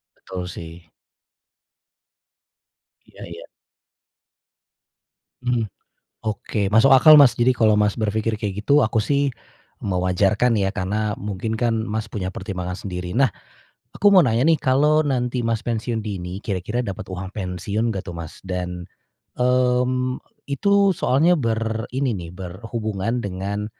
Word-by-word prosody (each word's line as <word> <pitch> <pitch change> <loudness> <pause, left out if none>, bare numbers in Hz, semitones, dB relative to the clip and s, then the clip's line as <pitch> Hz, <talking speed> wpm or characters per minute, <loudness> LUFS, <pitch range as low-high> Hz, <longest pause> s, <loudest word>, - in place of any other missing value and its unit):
Betul 90 -1 -7
sih. 85 0 -10 2.2
Iya - - -13
iya. - - -9 2.0
Mhm, 125 -2 0 0.6
oke 105 -1 -2
masuk 110 +7 +4
akal, 145 +4 +9
Mas. 140 -5 +8
Jadi 125 +1 +3
kalau 110 -2 +3
Mas 105 -1 +2
berpikir 110 0 -1
kayak 105 -2 -4
gitu 145 +4 +4
aku 110 0 +1
sih, 140 +4 +1 0.5
mewajarkan 95 +5 +1
ya 95 -1 +1
karena 105 +2 -1
mungkin 105 +2 -4
kan, 115 -1 0
Mas, 110 +1 -4
punya 95 -4 -3
pertimbangan 90 -3 -5
sendiri. 90 -2 -6
Nah, 135 +1 +3 0.6
aku 205 0 +4
mau 185 - +8
nanya 125 -3 +2
nih 165 0 +4
kalau 150 +4 +3
nanti, 125 -4 -1
Mas, 115 0 -2
pensiun 115 -1 -2
dini 90 -2 -5
kira-kira 105 +5 -2
dapat 95 -1 -6
uang 95 +1 -6
pensiun 100 +3 -2
nggak 100 -4 -3
tuh, 90 - -6
Mas? 80 -2 -9
Dan, 90 -1 -4 0.5
mmm, 125 0 +1 0.3
itu 200 +6 +3
soalnya 155 +3 +3
ber 110 -2 -2
ini 130 -2 0
nih 85 -4 -6
berhubungan 105 +4 -4
dengan, 100 +2 -3
110 Hz, 130 wpm, -22 LUFS, 95-125 Hz, 2.2 s, akal